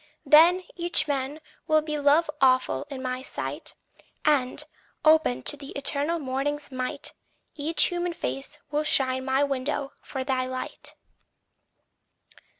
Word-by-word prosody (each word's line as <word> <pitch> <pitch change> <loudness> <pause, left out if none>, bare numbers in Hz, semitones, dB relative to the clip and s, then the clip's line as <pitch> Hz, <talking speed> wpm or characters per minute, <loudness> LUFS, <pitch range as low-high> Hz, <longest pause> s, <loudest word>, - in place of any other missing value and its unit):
Then 340 +4 +7
Each 345 -2 +2
man 280 +1 -2 0.3
will 310 0 +4
be 300 -1 -3
love 290 +3 +4
awful 260 +2 +3
in 270 -2 -6
my 255 0 -3
sight; - - -5 0.5
And, 285 -1 +2 0.4
open 310 - +4
to - - 0
the 280 -1 -10
eternal 285 +4 -1
morning's 285 +1 -3
might, 255 -1 -3 0.4
Each 310 +2 +2
human 350 -1 0
face 135 - -4
will 300 +1 +1
shine 260 -3 +2
my 265 +1 +2
window 275 0 -2
for 265 -2 -5
thy 260 -1 0
light. 255 0 -6
285 Hz, 130 wpm, -26 LUFS, 260-305 Hz, 0.5 s, Then